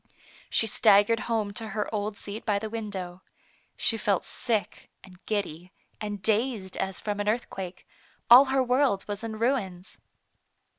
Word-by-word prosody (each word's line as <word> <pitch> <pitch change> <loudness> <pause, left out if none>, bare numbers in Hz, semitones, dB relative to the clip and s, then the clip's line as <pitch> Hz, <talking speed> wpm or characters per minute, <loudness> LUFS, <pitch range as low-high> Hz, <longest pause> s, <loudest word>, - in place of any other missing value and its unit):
She - - +2
staggered 215 +1 +4
home 215 -3 0
to 225 +1 -3
her 210 - 0
old 210 0 -2
seat 210 +2 -7
by 210 -2 +1
the 215 +1 -5
window. 190 -5 -5 0.6
She 225 - +1
felt 200 -3 +1
sick, 225 -4 -3
and 185 -1 -16
giddy, 180 -4 -3 0.3
and 205 -2 -5
dazed 220 -2 0
as 190 -1 -2
from 205 -1 -3
an 205 0 0
earthquake; 195 -5 -4 0.4
all 250 +4 +10
her 265 0 +1
world 250 -5 +1
was 205 +1 -5
in 220 -1 -5
ruins. 215 -7 -2
210 Hz, 150 wpm, -27 LUFS, 195-230 Hz, 0.6 s, all